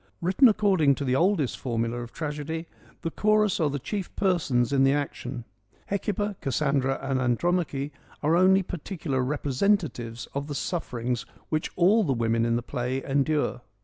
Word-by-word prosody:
Written 190 Hz, +8 st, +5 dB
according 190 Hz, -10 st, +3 dB
to 140 Hz, -, -4 dB
the 130 Hz, 0 st, +1 dB
oldest 170 Hz, -3 st, +1 dB
formula 115 Hz, -1 st, -2 dB
of 120 Hz, -1 st, -8 dB
tragedy, 155 Hz, +1 st, -4 dB, 0.4 s
the 165 Hz, -, -2 dB
chorus 210 Hz, 0 st, +2 dB
are 155 Hz, -3 st, +2 dB
the 140 Hz, -, -2 dB
chief 185 Hz, -, -4 dB
persons 140 Hz, -, +1 dB
in 135 Hz, -1 st, +4 dB
the 135 Hz, +1 st, +4 dB
action. 135 Hz, -4 st, -4 dB, 0.4 s
Hecuba, 205 Hz, 0 st, -2 dB
Cassandra 135 Hz, 0 st, +1 dB
and 135 Hz, -1 st, 0 dB
Andromache 145 Hz, +2 st, 0 dB, 0.3 s
are 155 Hz, +3 st, +3 dB
only 190 Hz, +2 st, +5 dB
particular 165 Hz, -6 st, -3 dB
representatives 135 Hz, -, 0 dB
of 140 Hz, +1 st, -3 dB
the 145 Hz, -, -4 dB
sufferings 125 Hz, -7 st, -3 dB, 0.2 s
which 155 Hz, 0 st, -1 dB
all 200 Hz, +6 st, +4 dB
the 140 Hz, -7 st, +1 dB
women 115 Hz, -1 st, +1 dB
in 115 Hz, -, +1 dB
the 120 Hz, -, -1 dB
play 130 Hz, +1 st, -3 dB
endure. 140 Hz, -2 st, 0 dB
145 Hz, 155 wpm, -26 LUFS, 130-180 Hz, 0.4 s, Written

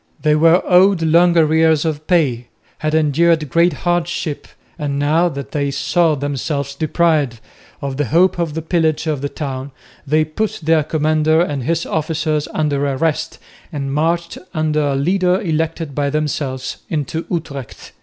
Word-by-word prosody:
They 150 Hz, -1 st, +4 dB
were 165 Hz, +3 st, +4 dB
owed 185 Hz, -1 st, +4 dB
long 170 Hz, +2 st, +4 dB
arrears 160 Hz, -1 st, +3 dB
of 155 Hz, -1 st, -3 dB
pay, 135 Hz, -10 st, +1 dB, 0.3 s
had 155 Hz, 0 st, -1 dB
endured 160 Hz, 0 st, +2 dB
great 170 Hz, +1 st, +3 dB
hardships, 175 Hz, -3 st, -2 dB, 0.3 s
and 145 Hz, -2 st, -2 dB
now 155 Hz, +5 st, +2 dB
that 140 Hz, -3 st, -7 dB
they 140 Hz, -1 st, -1 dB
saw 160 Hz, +3 st, +1 dB
themselves 140 Hz, 0 st, -3 dB
deprived 155 Hz, -4 st, +1 dB, 0.4 s
of 135 Hz, -1 st, -3 dB
the 150 Hz, -, 0 dB
hope 175 Hz, -, +2 dB
of 165 Hz, -3 st, -2 dB
the 160 Hz, -, -3 dB
pillage 160 Hz, -2 st, 0 dB
of 150 Hz, -4 st, -2 dB
the 145 Hz, -, -2 dB
town, 135 Hz, -2 st, -5 dB, 0.4 s
they 155 Hz, +2 st, +2 dB
put 200 Hz, +8 st, -3 dB
their 160 Hz, 0 st, +3 dB
commander 155 Hz, +1 st, +1 dB
and 145 Hz, -7 st, -1 dB
his 165 Hz, +1 st, 0 dB
officers 155 Hz, -1 st, -1 dB
under 145 Hz, -2 st, 0 dB
arrest 145 Hz, +3 st, -1 dB, 0.3 s
and 140 Hz, -3 st, -4 dB
marched 170 Hz, +3 st, -1 dB, 0.2 s
under 155 Hz, -1 st, +1 dB
a 140 Hz, -, 0 dB
leader 180 Hz, +5 st, +1 dB
elected 160 Hz, -4 st, -2 dB
by 145 Hz, 0 st, 0 dB
themselves 140 Hz, -3 st, -3 dB
into 155 Hz, +1 st, -3 dB
Utrecht. 140 Hz, -7 st, -6 dB
155 Hz, 155 wpm, -18 LUFS, 145-165 Hz, 0.4 s, They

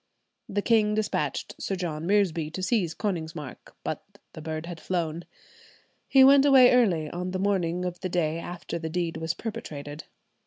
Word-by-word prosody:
The 205 Hz, 0 st, -1 dB
king 215 Hz, -2 st, +3 dB
despatched 215 Hz, -1 st, -2 dB
Sir 195 Hz, -, -2 dB
John 165 Hz, -3 st, -4 dB
Reresby 180 Hz, -6 st, +2 dB
to 185 Hz, -, -4 dB
seize 185 Hz, -6 st, +1 dB
Konigsmark, 160 Hz, -8 st, -5 dB
but -, -, -4 dB, 0.3 s
the 160 Hz, -, -9 dB
bird 155 Hz, 0 st, -4 dB
had 170 Hz, -1 st, -7 dB
flown; 170 Hz, -2 st, -2 dB, 0.8 s
he 270 Hz, -1 st, +6 dB
went 275 Hz, +1 st, +7 dB
away 265 Hz, -3 st, +7 dB
early, 185 Hz, -11 st, +3 dB
on 180 Hz, +1 st, -4 dB
the 185 Hz, -, -2 dB
morning 180 Hz, -3 st, 0 dB
of 180 Hz, -1 st, -4 dB
the 185 Hz, -, -3 dB
day 165 Hz, -2 st, 0 dB
after 170 Hz, 0 st, -6 dB
the 160 Hz, -1 st, -4 dB
deed 170 Hz, 0 st, -2 dB
was 160 Hz, +1 st, -2 dB
perpetrated. 150 Hz, -11 st, -7 dB
175 Hz, 165 wpm, -27 LUFS, 160-205 Hz, 0.8 s, went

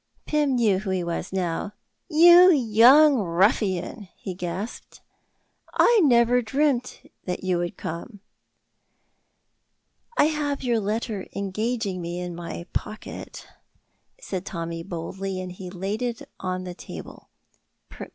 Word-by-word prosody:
Pym 295 Hz, -3 st, +1 dB
knew 215 Hz, -6 st, +3 dB
who 200 Hz, -1 st, -5 dB
he 185 Hz, -1 st, 0 dB
was 170 Hz, +1 st, -4 dB
now. 185 Hz, +1 st, -2 dB, 0.4 s
"You 350 Hz, +3 st, +8 dB
young 265 Hz, +2 st, +6 dB
ruffian," 190 Hz, +1 st, 0 dB
he 190 Hz, -, -6 dB
gasped, 180 Hz, +5 st, -6 dB, 0.8 s
"I 470 Hz, -3 st, +5 dB
never 245 Hz, -2 st, +4 dB
dreamt 255 Hz, +1 st, 0 dB, 0.2 s
that 180 Hz, 0 st, -4 dB
you 185 Hz, -2 st, +1 dB
would 175 Hz, 0 st, -4 dB
come!" 170 Hz, +6 st, -6 dB, 2.0 s
"I -, -, +6 dB
have 295 Hz, -3 st, -1 dB
your 240 Hz, -3 st, +1 dB
letter 210 Hz, -1 st, -3 dB
engaging 200 Hz, 0 st, -2 dB
me 170 Hz, +1 st, -4 dB
in 180 Hz, -1 st, -5 dB
my 170 Hz, 0 st, -7 dB
pocket," 215 Hz, -, -6 dB, 0.7 s
said 190 Hz, -, -5 dB
Tommy, 165 Hz, -3 st, -5 dB
boldly, 185 Hz, +2 st, -5 dB
and 185 Hz, -1 st, -6 dB
he 180 Hz, 0 st, -8 dB
laid 195 Hz, +4 st, -4 dB
it 240 Hz, -2 st, -3 dB
on 185 Hz, 0 st, -3 dB
the 180 Hz, -1 st, -6 dB
table. -, -, -10 dB
200 Hz, 120 wpm, -25 LUFS, 180-245 Hz, 2.0 s, You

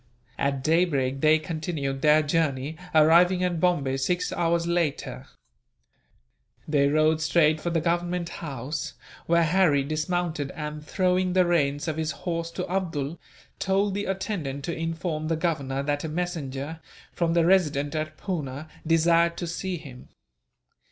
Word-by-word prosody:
At 140 Hz, -1 st, 0 dB
daybreak 145 Hz, -5 st, +1 dB
they 155 Hz, 0 st, +5 dB
continued 155 Hz, -4 st, -3 dB
their 150 Hz, +1 st, +5 dB
journey, 145 Hz, -1 st, 0 dB, 0.2 s
arriving 175 Hz, +4 st, +5 dB
at 175 Hz, -2 st, 0 dB
Bombay 145 Hz, -7 st, +1 dB
six 175 Hz, +7 st, -1 dB
hours 170 Hz, 0 st, +1 dB
later. 170 Hz, -, -2 dB, 1.4 s
They 145 Hz, -2 st, +3 dB
rode 155 Hz, +2 st, +3 dB
straight 155 Hz, -1 st, +3 dB
for 175 Hz, -, -1 dB
the 165 Hz, -1 st, 0 dB
Government 175 Hz, +1 st, -1 dB
House, 145 Hz, -1 st, -5 dB, 0.3 s
where 170 Hz, 0 st, +4 dB
Harry 165 Hz, -4 st, +3 dB
dismounted 155 Hz, 0 st, -2 dB
and, 150 Hz, 0 st, -5 dB
throwing 185 Hz, +2 st, +1 dB
the 185 Hz, -1 st, +4 dB
reins 145 Hz, -4 st, +1 dB
of 160 Hz, -1 st, -2 dB
his 160 Hz, -1 st, -1 dB
horse 165 Hz, -1 st, -2 dB
to -, -, -3 dB
Abdool, 165 Hz, -5 st, -2 dB, 0.4 s
told 195 Hz, +1 st, +1 dB
the 205 Hz, +1 st, -2 dB
attendant 185 Hz, -8 st, -3 dB
to 170 Hz, -, -3 dB
inform 165 Hz, -1 st, -3 dB
the 165 Hz, -, +1 dB
Governor 140 Hz, -5 st, -1 dB
that 145 Hz, 0 st, -1 dB
a 160 Hz, -, -3 dB
messenger, 155 Hz, -3 st, -4 dB, 0.3 s
from 170 Hz, -1 st, 0 dB
the 170 Hz, -1 st, +3 dB
Resident 150 Hz, -6 st, +2 dB
at 155 Hz, 0 st, -3 dB
Poona, 155 Hz, -5 st, -4 dB, 0.2 s
desired 170 Hz, +1 st, +3 dB
to 175 Hz, -, -3 dB
see 180 Hz, +2 st, -3 dB
him. 135 Hz, -6 st, -12 dB
160 Hz, 145 wpm, -26 LUFS, 145-175 Hz, 1.4 s, they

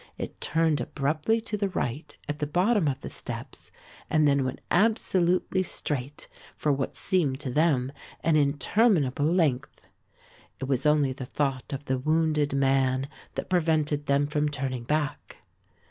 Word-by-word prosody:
It -, -, -7 dB
turned 160 Hz, -2 st, +2 dB
abruptly 155 Hz, +11 st, 0 dB
to 215 Hz, -1 st, -4 dB
the 200 Hz, -1 st, 0 dB
right 145 Hz, -3 st, -4 dB
at 145 Hz, 0 st, -4 dB
the 150 Hz, -, -1 dB
bottom 180 Hz, +3 st, +2 dB
of 135 Hz, -2 st, -1 dB
the -, -, -6 dB
steps -, -, -7 dB, 0.4 s
and 155 Hz, -1 st, +3 dB
then 140 Hz, -1 st, +3 dB
went 130 Hz, 0 st, -3 dB
absolutely 185 Hz, -3 st, +2 dB
straight 145 Hz, -6 st, -4 dB, 0.3 s
for 150 Hz, -, +1 dB
what 135 Hz, -1 st, -2 dB
seemed 150 Hz, -8 st, 0 dB
to 130 Hz, -, -3 dB
them 135 Hz, -3 st, +2 dB, 0.3 s
an 160 Hz, -1 st, +3 dB
interminable 145 Hz, -, +2 dB
length. 140 Hz, -7 st, 0 dB, 0.7 s
It 135 Hz, -, -3 dB
was 135 Hz, +1 st, +1 dB
only 150 Hz, -3 st, +3 dB
the 130 Hz, -1 st, -7 dB
thought 135 Hz, -3 st, -2 dB
of 140 Hz, 0 st, -5 dB
the 130 Hz, -2 st, 0 dB
wounded 155 Hz, 0 st, +1 dB
man 135 Hz, 0 st, +2 dB, 0.3 s
that -, -, -4 dB
prevented 155 Hz, -4 st, +1 dB
them 140 Hz, +1 st, +3 dB
from 150 Hz, 0 st, 0 dB
turning 130 Hz, -4 st, -4 dB
back. 150 Hz, +1 st, -2 dB
145 Hz, 150 wpm, -27 LUFS, 135-160 Hz, 0.7 s, and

